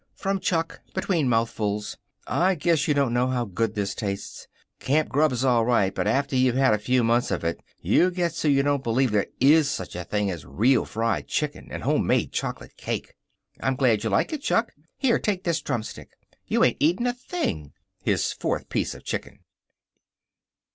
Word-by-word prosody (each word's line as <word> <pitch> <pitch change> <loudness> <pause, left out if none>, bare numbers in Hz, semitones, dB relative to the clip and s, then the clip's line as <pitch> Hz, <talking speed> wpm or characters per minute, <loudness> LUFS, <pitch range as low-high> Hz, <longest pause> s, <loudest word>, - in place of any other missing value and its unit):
From 195 0 -1
Chuck, 165 -3 -1
between 165 -9 +1
mouthfuls: 105 -3 -1 0.3
"I 185 +2 +2
guess 160 -1 +1
you 150 - +2
don't 140 -4 +1
know 125 +1 +2
how 125 -2 -1
good 105 +2 -2
this 100 -1 -1
tastes. 100 -2 -5 0.3
Camp 150 +3 +1
grub's 135 -3 +2
all 120 -3 +4
right, 110 -5 +2
but - - -1
after 135 +5 +1
you've 130 -1 +3
had 135 -3 +4
a 105 - +1
few 125 +3 +1
months 120 +2 +2
of - - -2
it 85 0 -2 0.2
you 180 - +4
get 175 -2 -1
so 160 - -2
you 140 -1 +4
don't 145 -1 +1
believe 120 +1 +1
there 105 -1 +1
IS 145 +2 +5
such 95 -10 -4
a 90 - -4
thing 105 +2 -1
as 85 -5 -6
real 115 - +2
fried 115 +1 -1
chicken 150 -1 -2
and - - -6
homemade - - +1
chocolate - - -4
cake." - - -4 0.5
"I'm 130 - 0
glad 120 -6 +2
you 110 - 0
like 100 - +1
it, 300 - -3
Chuck. 230 -4 +1 0.3
Here, 250 -4 +2
take 195 -3 -1
this 170 -2 0
drumstick. 120 -6 -4 0.4
You - - +2
ain't - - +3
eating 175 +11 +2
a 245 - +1
thing!" 245 - -4 0.3
His - - 0
fourth - - -3
piece - - -1
of - - -13
chicken. - - -5
130 Hz, 190 wpm, -25 LUFS, 110-155 Hz, 0.5 s, IS